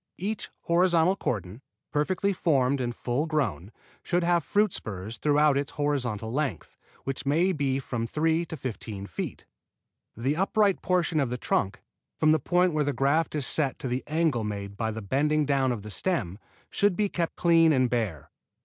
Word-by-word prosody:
Each 205 +4 -3
horizontal 175 +1 +3
cordon, 105 - -3 0.3
perfectly 185 +6 +1
formed 140 -6 +1
and 120 -1 -2
full 125 +6 -1
grown, 110 - -1 0.3
should 175 -1 0
have 170 -1 +2
fruit 210 +6 +2
spurs 105 +2 -5
throughout 150 -1 +3
its 140 - -4
horizontal 125 -7 -1
length, 135 - -3 0.3
which 135 -1 -3
may 160 +7 +2
be 140 -5 0
from 120 -4 -3
three 160 +5 +1
to 160 - -6
fifteen 110 -6 -5
feet. - - -6 0.7
The 130 +6 0
upright 200 +1 +2
portion 175 -3 +1
of 135 -4 +1
the 125 - -3
trunk, 100 -4 -1 0.3
from 155 -1 +4
the 155 - +4
point 175 +4 +2
where 155 -1 +2
the 145 0 -1
graft 140 +6 +1
is 145 -3 -1
set 140 -2 0
to - - -5
the 125 +1 -2
angle 155 -6 +1
made 100 -1 -5
by 110 +2 -1
the 110 0 -5
bending 150 +7 +1
down 135 -2 +2
of 110 -5 -4
the 105 - -8
stem, 105 - -1 0.3
should 205 -2 +2
be 210 +2 +1
kept 170 -4 -2
clean 165 -2 +5
and 130 -3 +3
bare. 110 - -2
145 Hz, 175 wpm, -27 LUFS, 120-165 Hz, 0.7 s, clean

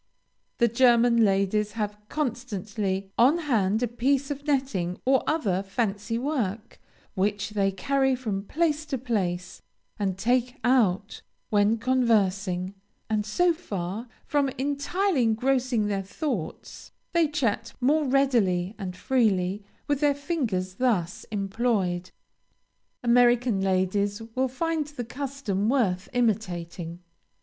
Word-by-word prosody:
The 235 - +4
German 235 0 +4
ladies 205 +1 +1
have 210 -2 -2
constantly 205 -8 -3
on 265 +8 +6
hand 225 - +1
a - - +2
piece 270 +4 0
of 285 +1 -6
netting 230 -11 0
or 265 0 +4
other 205 - +1
fancy 210 +2 -2
work, 235 -5 -3 0.3
which 205 +1 -1
they 200 -2 +1
carry 265 +6 +1
from 210 -6 -3
place 315 -2 0
to 275 -3 -2
place, 190 -8 -2 0.4
and 190 -2 -1
take 245 +4 +1
out 215 -5 +2 0.3
when 210 +2 +3
conversing; 200 -7 +1 0.4
and 215 -1 0
so 350 +11 +3
far 205 - -5 0.2
from 285 -2 +1
entirely 285 +5 0
engrossing 245 0 +1
their 200 -1 -1
thoughts, 205 - -5 0.2
they 340 -2 +4
chat 230 -7 -1
more 295 +4 +2
readily 225 -9 +2
and 180 -2 -5
freely 200 -6 +1 0.2
with 290 -2 +1
their 290 -1 +3
fingers 245 - -2
thus 200 -9 0
employed. 195 -3 -1 0.9
American 240 -3 +4
ladies 195 +2 +1
will 260 +2 +1
find 315 +3 -2
the 290 -5 -6
custom 250 -6 -2
worth 195 -9 +1
imitating. 180 -7 -2
230 Hz, 120 wpm, -26 LUFS, 195-265 Hz, 0.9 s, on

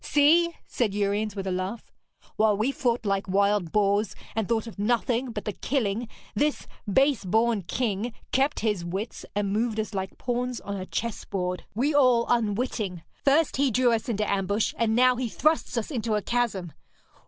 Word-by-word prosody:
'See!' 330 +4 +4
said 215 -5 -1
Uriens, 205 +1 0
with 195 -1 -4
a 190 - -1
laugh, 185 +5 -4 0.4
'while 215 -1 +3
we 225 +6 +1
fought 240 -4 -1
like 195 -1 0
wild 200 -2 +2
boars, 205 0 +2 0.2
and 220 -3 -1
thought 225 -1 +1
of 225 -3 -10
nothing 240 +3 +1
but 210 -2 -5
the 210 - -1
killing, 235 -3 -1 0.3
this 295 +7 0 0.3
base 270 +2 +3
born 220 +3 +2
king 220 +3 -2 0.2
kept 270 +3 +1
his 210 -5 0
wits 190 +7 -5
and 200 -1 0
moved 220 0 0
us 215 0 -3
like 190 -1 -4
pawns 245 0 -2
on 200 - -5
a 185 -1 -5
chessboard, 185 -5 -3
we 275 +7 +1
all 250 -5 +4
unwitting. 215 -5 0 0.2
First, 285 +1 +3
he 280 0 +3
drew 245 +1 +3
us 230 +2 -1
into 210 -2 0
ambush, 200 +2 0
and 225 -1 +1
now 250 +1 +5
he 250 -2 -2
thrusts 310 0 +1
us 230 +6 -2
into 230 -5 -1
a 210 - 0
chasm. 215 -9 -1
220 Hz, 175 wpm, -26 LUFS, 200-245 Hz, 0.4 s, now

